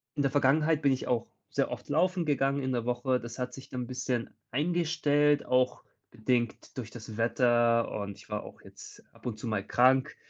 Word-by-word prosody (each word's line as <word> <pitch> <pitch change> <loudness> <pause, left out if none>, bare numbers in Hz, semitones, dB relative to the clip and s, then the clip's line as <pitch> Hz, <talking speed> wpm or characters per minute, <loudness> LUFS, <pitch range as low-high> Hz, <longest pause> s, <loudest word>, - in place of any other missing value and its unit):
in 145 - 0
der 140 - +1
Vergangenheit 150 +3 +3
bin 140 - +4
ich 130 - -1
auch 120 -1 0 0.2
sehr - - 0
oft - - -6
laufen 185 -2 +2
gegangen 140 -1 +1
in 130 - -1
der 120 -2 -1
Woche. 125 +1 0
Das 120 -1 -8
hat 125 0 -3
sich 135 - -10
dann 125 - -4
'n - - -8
bisschen 125 -1 -2 0.2
eingestellt, 150 -1 +2
auch 125 0 +1 0.3
bedingt 120 0 -1
durch 120 -4 -5
das 110 -2 -9
Wetter 120 0 +3
und 100 -1 -5
ich 110 - -17
war 105 0 -3
auch - - -12
jetzt - - -13
ab - - -20
und 110 -3 -3
zu 110 - -8
mal 105 -3 -1
krank. 130 +5 +3
125 Hz, 205 wpm, -30 LUFS, 120-145 Hz, 0.3 s, bin